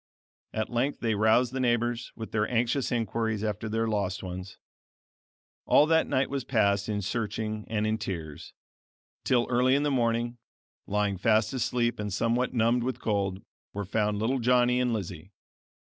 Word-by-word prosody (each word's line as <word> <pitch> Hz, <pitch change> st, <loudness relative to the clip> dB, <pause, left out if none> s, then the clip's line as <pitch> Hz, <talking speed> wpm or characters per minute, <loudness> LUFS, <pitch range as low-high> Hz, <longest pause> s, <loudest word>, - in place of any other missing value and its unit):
At 110 Hz, +2 st, -3 dB
length 125 Hz, +4 st, -1 dB
they 115 Hz, -2 st, +1 dB
roused 110 Hz, +4 st, +3 dB
the 135 Hz, -, -2 dB
neighbors 120 Hz, 0 st, 0 dB
with 110 Hz, -1 st, -7 dB
their 105 Hz, -1 st, 0 dB
anxious 120 Hz, +3 st, 0 dB
inquiries 110 Hz, -2 st, -1 dB
after 110 Hz, 0 st, -2 dB
their 115 Hz, +1 st, 0 dB
lost 100 Hz, -4 st, -1 dB
ones. 90 Hz, 0 st, -7 dB, 1.1 s
All 150 Hz, -, +6 dB
that 160 Hz, +1 st, +3 dB
night 130 Hz, +1 st, +1 dB
was 140 Hz, -2 st, -3 dB
passed 100 Hz, -4 st, +1 dB
in 105 Hz, -1 st, -1 dB
searching 110 Hz, 0 st, -3 dB
and 110 Hz, -1 st, -1 dB
in 110 Hz, +1 st, 0 dB
tears, 80 Hz, -8 st, -6 dB, 0.7 s
till 120 Hz, -2 st, +2 dB
early 125 Hz, +2 st, +3 dB
in 140 Hz, -, +1 dB
the 145 Hz, -, +1 dB
morning, 120 Hz, -1 st, 0 dB, 0.5 s
lying 100 Hz, -2 st, 0 dB
fast 110 Hz, +2 st, +2 dB
asleep 120 Hz, -2 st, 0 dB
and 105 Hz, -1 st, -3 dB
somewhat 115 Hz, +5 st, 0 dB
numbed 120 Hz, +1 st, +2 dB
with 125 Hz, 0 st, -2 dB
cold, 100 Hz, -3 st, -1 dB, 0.3 s
were 100 Hz, 0 st, -3 dB
found 105 Hz, +1 st, 0 dB
little 120 Hz, +5 st, 0 dB
Johnny 125 Hz, +1 st, +3 dB
and 125 Hz, -1 st, +1 dB
Lizzie. 95 Hz, -3 st, -5 dB
115 Hz, 160 wpm, -28 LUFS, 105-120 Hz, 1.1 s, All